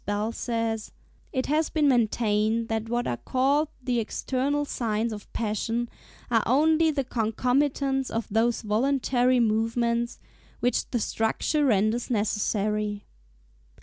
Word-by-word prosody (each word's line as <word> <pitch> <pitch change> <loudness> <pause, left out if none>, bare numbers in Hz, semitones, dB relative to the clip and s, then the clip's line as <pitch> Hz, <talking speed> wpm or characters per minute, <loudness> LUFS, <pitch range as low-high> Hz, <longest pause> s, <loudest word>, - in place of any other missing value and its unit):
Bell 205 +2 -1
says, 230 -2 -2 0.4
"It 260 -2 -1
has 305 +2 +1
been 305 -2 +2
maintained 225 -2 +1
that 225 0 -2
what 240 +1 0
are 120 - -1
called 275 - +1 0.2
the 245 -2 0
external 270 +5 -1
signs 225 -3 -1
of 210 - -10
passion, 230 +2 -2 0.4
are 225 -2 +4
only 315 +6 +4
the 285 -3 0
concomitants 260 +3 0
of 225 0 -2
those 230 +3 +1
voluntary 250 +2 +2
movements 235 +1 +1 0.4
which 245 - 0
the 240 - -1
structure 225 +8 0
renders 215 +1 +1
necessary." 210 -1 -1
235 Hz, 120 wpm, -26 LUFS, 220-260 Hz, 0.4 s, are